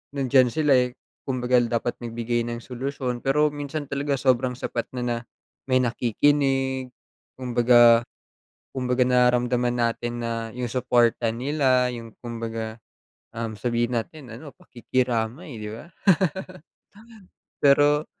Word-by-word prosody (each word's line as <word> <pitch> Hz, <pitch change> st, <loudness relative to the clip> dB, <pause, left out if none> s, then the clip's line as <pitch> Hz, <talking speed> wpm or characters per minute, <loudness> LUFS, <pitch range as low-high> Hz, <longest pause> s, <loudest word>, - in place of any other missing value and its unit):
nandiyan 130 Hz, -2 st, +4 dB
sila 150 Hz, 0 st, +2 dB, 0.2 s
eh, 125 Hz, -, -21 dB, 0.3 s
kumbaga 125 Hz, -1 st, +2 dB
dapat 120 Hz, +1 st, -1 dB
nagbigay 120 Hz, 0 st, -2 dB
ng 120 Hz, -, -4 dB
solusyon 125 Hz, -1 st, -4 dB
pero 150 Hz, +2 st, +2 dB
minsan 145 Hz, +1 st, -5 dB
talaga 140 Hz, 0 st, -2 dB
sobrang 125 Hz, -1 st, +1 dB
sapat 120 Hz, -2 st, -4 dB
na 120 Hz, -1 st, -2 dB, 0.5 s
may 130 Hz, -, +4 dB
nakikinig 130 Hz, +2 st, +1 dB, 0.5 s
kumbaga, 120 Hz, -2 st, +5 dB, 0.7 s
kumbaga 125 Hz, -1 st, +1 dB
nararamdaman 125 Hz, -1 st, +2 dB
natin 120 Hz, 0 st, -2 dB
na 115 Hz, -1 st, -3 dB
yung 125 Hz, -2 st, -3 dB
suporta 120 Hz, -2 st, +2 dB
nila, 130 Hz, -1 st, +1 dB
yung 115 Hz, -2 st, -9 dB
kumbaga, 115 Hz, -1 st, -5 dB, 0.6 s
um, 115 Hz, -1 st, -3 dB
sabihin 120 Hz, +3 st, -1 dB
natin 125 Hz, -1 st, -9 dB
ano 145 Hz, +5 st, -9 dB
pakikiramay 125 Hz, +2 st, -3 dB
'di 105 Hz, -, -5 dB
ba. 150 Hz, +9 st, -11 dB, 1.7 s
Pero 145 Hz, +2 st, +4 dB
125 Hz, 110 wpm, -24 LUFS, 120-135 Hz, 1.7 s, kumbaga